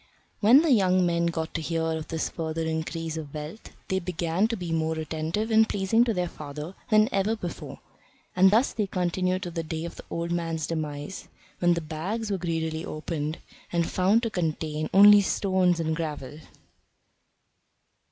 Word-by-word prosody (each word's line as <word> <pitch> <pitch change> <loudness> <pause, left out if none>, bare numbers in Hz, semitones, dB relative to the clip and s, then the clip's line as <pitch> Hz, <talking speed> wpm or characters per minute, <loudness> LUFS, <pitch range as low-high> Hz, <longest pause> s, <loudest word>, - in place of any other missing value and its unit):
When 245 +8 +7
the 325 - +2
young 185 -5 +4
men 170 0 +1
got 160 -1 -3
to 165 - -2
hear 165 0 -1
of 160 -1 -2
this 160 -1 -2
further 165 -1 -3
increase 160 0 -3
of 155 -2 -7
wealth 150 +8 -7 0.2
they 190 - 0
began 175 +2 0
to 230 0 -3
be 175 -3 -5
more 160 0 0
attentive 160 +7 -2
and 220 0 +5
pleasing 205 +4 +2
to 230 - 0
their 180 -1 0
father 150 +2 -7 0.2
than 215 0 +5
ever 200 +3 +1
before. 180 -6 -7 0.6
And 190 +1 +6
thus 225 +7 +3
they 210 -3 -1
continued 185 0 -1
to 175 - -5
the 165 0 -3
day 160 0 -4
of 170 - -8
the - - -9
old 170 0 -3
man's 165 -2 -1
demise, 155 +2 -5 0.3
when 175 -1 +3
the 170 - -2
bags 190 +8 -4
were 195 - -1
greedily 160 -2 -2
opened, 155 -1 -4 0.3
and 170 -1 +1
found 200 +6 +2
to 230 - -1
contain 155 -3 -2
only 205 +1 +8
stones 185 -3 +1
and 160 -1 0
gravel! 150 -3 -5
170 Hz, 175 wpm, -26 LUFS, 160-190 Hz, 0.6 s, only